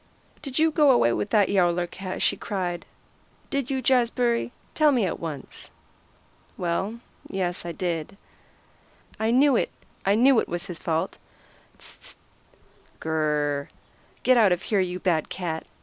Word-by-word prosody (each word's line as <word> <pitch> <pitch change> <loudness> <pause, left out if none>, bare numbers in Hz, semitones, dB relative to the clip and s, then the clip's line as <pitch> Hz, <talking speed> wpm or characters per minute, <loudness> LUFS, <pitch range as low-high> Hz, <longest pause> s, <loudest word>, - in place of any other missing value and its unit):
"Did 275 -3 -4
you 320 +1 +4
go 300 -2 +4
away 120 - +5
with 205 - -2
that 210 -2 +4
Yowler 175 -3 +2
cat?" 185 +1 -5
she - - +3
cried. 180 -4 -3 0.6
"Did 275 -3 -1
you, 265 -1 -1
Jazbury? 240 -1 +2 0.2
Tell 305 -1 +4
me 245 -7 +2
at 175 - -3
once." 155 -5 -7 0.9
"Well, 190 +6 -2 0.3
yes, 180 -2 -2
I - - -2
did." 170 +1 -3 1.0
"I 220 +1 +1
knew 265 +3 +5
it! - - +1 0.3
It's 205 +5 +3
all 195 -9 +2
his 175 -3 -6
fault. 160 0 -2 0.6
S - - -7
s - - -10
st! - - -10 0.8
Gr 160 - -5
r - - 0
r 155 -1 +2 0.3
r! 140 - -7 0.5
Get 255 -1 +5
out 215 -5 +6
of 180 0 +1
here, 205 - +1
you 180 -1 0
bad 170 -4 +1
cat!" 165 -3 -4
190 Hz, 160 wpm, -25 LUFS, 175-240 Hz, 1.0 s, out